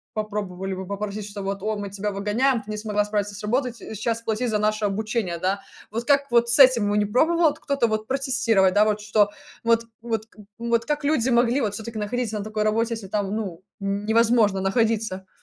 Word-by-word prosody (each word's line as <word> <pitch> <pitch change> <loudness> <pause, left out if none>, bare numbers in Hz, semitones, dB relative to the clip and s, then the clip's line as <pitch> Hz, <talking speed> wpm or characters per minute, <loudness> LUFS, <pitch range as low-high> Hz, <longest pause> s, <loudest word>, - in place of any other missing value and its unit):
попробовали 200 -3 -3
бы 190 0 -5
попросить, 205 +1 -4
что 200 -1 -6
вот: 195 0 -3
"О, 215 0 -1
мы 200 -1 -5
тебя 205 +1 -3
выгоняем, 220 +5 +1
ты 210 - -15
не 210 - -3
смогла 210 -1 0
справиться 205 -1 -2
с 205 - -8
работой, 250 +3 0
ти" 230 - -15
и - - -5
сейчас 230 +2 -2
платить 230 +2 -1
за 215 - +1
наше 215 0 0
обучение, 205 -3 -1
да. 195 +2 0 0.3
Вот 230 +2 -2
как 280 -1 +3
вот 235 0 +4
с 235 - +3
этим 255 -6 +7
бы 205 - +1
не 205 - +3
пробовал 315 +7 +3
кто-то 280 -5 0
вот 215 0 -2
протестировать, 250 -8 +2
да, 210 +1 +5
вот 210 0 +1
что 205 -1 +3 0.3
вот, 230 0 +3 0.2
вот 225 -2 -2
к 225 - -29 0.2
вот 235 0 0
как 295 -1 -1
люди 265 -4 +2
могли 240 +3 +3
вот 210 -3 -1
все-таки 220 +1 -6
находиться 220 0 -2
на 200 - -3
такой 215 0 -2
работе, 225 +2 +1
если 205 -4 -8
там, 200 0 -2
ну, 190 -6 -4 0.2
невозможно 210 +1 +2
находиться? 205 -2 0
215 Hz, 215 wpm, -24 LUFS, 205-235 Hz, 0.3 s, этим